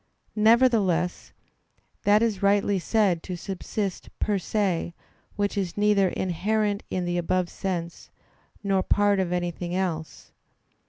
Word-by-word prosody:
Nevertheless, 215 Hz, -6 st, +3 dB, 0.7 s
that 210 Hz, +2 st, +5 dB
is 215 Hz, -5 st, 0 dB
rightly 200 Hz, 0 st, +2 dB
said 190 Hz, -3 st, +1 dB
to 180 Hz, -, -5 dB
subsist 195 Hz, +1 st, -4 dB
per 205 Hz, -2 st, 0 dB
se, 180 Hz, -4 st, -1 dB, 0.4 s
which 205 Hz, 0 st, -1 dB
is 190 Hz, -3 st, -2 dB
neither 205 Hz, -2 st, +3 dB
inherent 205 Hz, +4 st, -1 dB
in 180 Hz, -1 st, -2 dB
the 175 Hz, 0 st, -1 dB
above 175 Hz, +1 st, 0 dB
sense, 170 Hz, -3 st, -5 dB, 0.5 s
nor 195 Hz, -1 st, +2 dB
part 205 Hz, +1 st, +2 dB
of 185 Hz, -2 st, -1 dB
anything 175 Hz, 0 st, -2 dB
else. 170 Hz, -4 st, -3 dB
195 Hz, 120 wpm, -26 LUFS, 175-205 Hz, 0.7 s, that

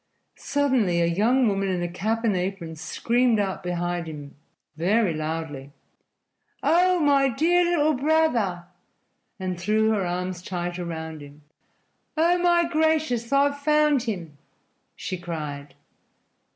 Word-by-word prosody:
Suddenly 255 Hz, -11 st, +1 dB
a 170 Hz, -, +3 dB
young 225 Hz, +9 st, +2 dB
woman 195 Hz, -1 st, 0 dB
in 180 Hz, -2 st, -1 dB
a -, -, -1 dB
cap 220 Hz, +6 st, -2 dB
and 215 Hz, -4 st, +2 dB
apron 180 Hz, -3 st, -3 dB
screamed 230 Hz, +8 st, +1 dB
out 195 Hz, -2 st, -2 dB
behind 175 Hz, -1 st, -3 dB
him 145 Hz, -3 st, -9 dB, 0.4 s
very 190 Hz, +3 st, +2 dB
loudly: 155 Hz, -3 st, -5 dB, 0.9 s
"Oh, 360 Hz, +2 st, +3 dB
my 280 Hz, -3 st, +3 dB
dear 335 Hz, +8 st, +2 dB
little 305 Hz, +1 st, +3 dB
brother!" 255 Hz, -, +1 dB, 0.7 s
and 185 Hz, -2 st, -3 dB
threw 215 Hz, +4 st, +2 dB
her 210 Hz, -3 st, 0 dB
arms 180 Hz, 0 st, -3 dB
tight 175 Hz, -1 st, -4 dB
around 160 Hz, -2 st, -5 dB
him. 145 Hz, +1 st, -14 dB, 0.7 s
"Oh, 345 Hz, +3 st, +3 dB
my 345 Hz, -1 st, +3 dB
gracious, 310 Hz, -7 st, 0 dB
I've 285 Hz, +1 st, +2 dB
found 300 Hz, -1 st, +3 dB
him!" 175 Hz, -, -5 dB, 0.6 s
she 185 Hz, -, -5 dB
cried. 150 Hz, -5 st, -6 dB
195 Hz, 125 wpm, -25 LUFS, 170-280 Hz, 0.9 s, a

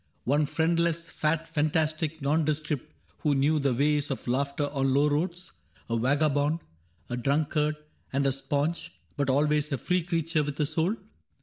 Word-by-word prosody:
One 145 Hz, +3 st, +2 dB
friendless, 170 Hz, +1 st, +1 dB
fat, 155 Hz, +1 st, -1 dB
fantastic 155 Hz, 0 st, 0 dB
nondescript 150 Hz, -1 st, 0 dB, 0.3 s
Who 150 Hz, -2 st, +2 dB
knew 150 Hz, +3 st, +3 dB
the 140 Hz, -2 st, +1 dB
ways 145 Hz, +2 st, +2 dB
of 135 Hz, -, -4 dB
laughter 140 Hz, +3 st, 0 dB
on 135 Hz, -2 st, +1 dB
low 145 Hz, +2 st, +4 dB
roads, 175 Hz, +5 st, -1 dB, 0.2 s
— -, -, -31 dB
A -, -, +2 dB
vagabond, 145 Hz, +5 st, +2 dB, 0.5 s
a 120 Hz, -, -3 dB
drunkard, 150 Hz, +4 st, +1 dB, 0.4 s
and 140 Hz, +1 st, +1 dB
a 135 Hz, -, +3 dB
sponge. 145 Hz, +5 st, -2 dB, 0.2 s
But 140 Hz, -3 st, 0 dB
always 150 Hz, +2 st, +2 dB
a 140 Hz, -, 0 dB
free 180 Hz, +9 st, 0 dB
creature 165 Hz, -1 st, 0 dB
with 145 Hz, 0 st, -5 dB
a 150 Hz, -, +3 dB
soul 160 Hz, +7 st, 0 dB
150 Hz, 160 wpm, -28 LUFS, 140-160 Hz, 0.5 s, low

